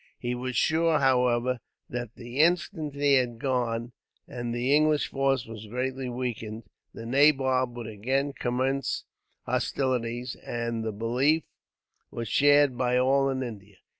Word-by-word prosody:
He 120 0 -3
was 125 0 -4
sure, 160 +5 +3
however, 125 -2 +2 0.3
that 120 -2 -5
the 120 +2 -7
instant 165 -2 +1
he 140 0 +3
had 125 -3 +2
gone, 120 -2 -1 0.4
and 120 -3 -5
the 125 +4 +2
English 155 0 +2
force 135 -2 +1
was 110 -1 -9
greatly 130 +3 -3
weakened, 115 -3 -4 0.3
the 115 - -9
nabob 130 -2 +3
would 120 - -5
again 130 +7 -1
commence 130 +2 -1 0.4
hostilities; 125 -2 -1
and 115 -1 -3
the 110 - -2
belief 125 +9 +1 0.7
was 115 -1 -5
shared 145 +1 +4
by 125 0 +2
all 135 +2 +3
in 130 -1 -1
India. 105 -5 -9
125 Hz, 135 wpm, -27 LUFS, 120-135 Hz, 0.7 s, shared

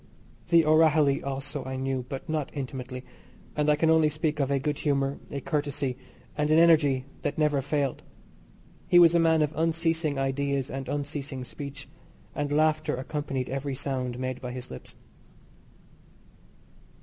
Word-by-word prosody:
The 170 -2 +5
O'Rahilly 155 -2 +4
also 140 0 -3
I 130 0 -5
knew, 130 -1 -2
but 135 - -6
not 155 -3 -2
intimately, 130 -2 -5 0.5
and 150 0 +1
I 150 - +5
can 160 +2 +3
only 160 -1 +5
speak 155 0 -2
of 140 -2 +1
a 140 - +2
good 145 +1 -2
humour, 140 -2 0
a 140 - -4
courtesy, 145 -3 -1 0.4
and 150 0 0
an 155 - +5
energy 150 -6 +5 0.2
that - - -2
never 150 -3 +2
failed. 140 -1 -1 0.9
He 175 - +5
was 170 -1 +8
a 170 - +4
man 160 -1 +4
of 150 +1 -2
unceasing 165 -2 0
ideas 135 0 -1
and 135 0 -5
unceasing 145 -2 -4
speech, 140 +2 -8 0.5
and 145 -1 -2
laughter 155 0 +2
accompanied 135 0 -3
every 135 0 -3
sound 130 -2 -3
made 130 0 -4
by 125 -1 -5
his 125 -1 -7
lips. 65 - -9
145 Hz, 155 wpm, -27 LUFS, 135-155 Hz, 0.9 s, was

